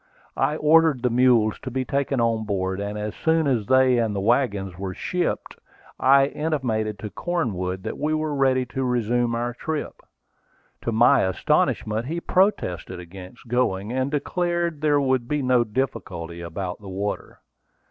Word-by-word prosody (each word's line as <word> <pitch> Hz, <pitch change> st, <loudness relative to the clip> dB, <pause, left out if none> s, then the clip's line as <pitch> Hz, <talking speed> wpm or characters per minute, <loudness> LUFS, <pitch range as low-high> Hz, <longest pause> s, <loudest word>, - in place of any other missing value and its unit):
I 150 Hz, -, +1 dB
ordered 155 Hz, -4 st, +4 dB
the 125 Hz, -, +2 dB
mules 120 Hz, -3 st, +3 dB
to 130 Hz, -, -6 dB
be 130 Hz, +1 st, -2 dB
taken 140 Hz, 0 st, -1 dB
on 115 Hz, -1 st, +1 dB
board; 95 Hz, -2 st, -2 dB
and 100 Hz, +1 st, -4 dB
as 105 Hz, 0 st, -4 dB
soon 160 Hz, 0 st, +1 dB
as 120 Hz, -7 st, 0 dB
they 130 Hz, -1 st, +4 dB
and 110 Hz, -3 st, 0 dB
the -, -, -1 dB
wagons 100 Hz, -4 st, +1 dB
were 95 Hz, 0 st, -5 dB
shipped, 180 Hz, -1 st, -2 dB, 0.4 s
I 135 Hz, +1 st, +5 dB
intimated 130 Hz, -9 st, -2 dB
to 105 Hz, +1 st, -7 dB
Cornwood 95 Hz, -, -2 dB
that -, -, -5 dB
we 150 Hz, +2 st, 0 dB
were 155 Hz, -1 st, -1 dB
ready 130 Hz, -2 st, +2 dB
to 130 Hz, +2 st, -4 dB
resume 120 Hz, -1 st, 0 dB
our 120 Hz, +1 st, -2 dB
trip. 155 Hz, +5 st, -5 dB, 0.8 s
To 115 Hz, -, -2 dB
my 120 Hz, +5 st, +5 dB
astonishment 105 Hz, +4 st, 0 dB
he 165 Hz, +3 st, -2 dB
protested 95 Hz, -, 0 dB
against 90 Hz, +6 st, -11 dB
going, 115 Hz, -3 st, 0 dB
and 130 Hz, +1 st, 0 dB
declared 170 Hz, +1 st, -1 dB
there 150 Hz, -2 st, +3 dB
would 130 Hz, -3 st, +1 dB
be 150 Hz, 0 st, -1 dB
no 125 Hz, -1 st, +3 dB
difficulty 90 Hz, -8 st, -4 dB
about 90 Hz, +3 st, -5 dB
the 100 Hz, -, -9 dB
water. 100 Hz, +2 st, -4 dB
120 Hz, 160 wpm, -24 LUFS, 105-140 Hz, 0.8 s, I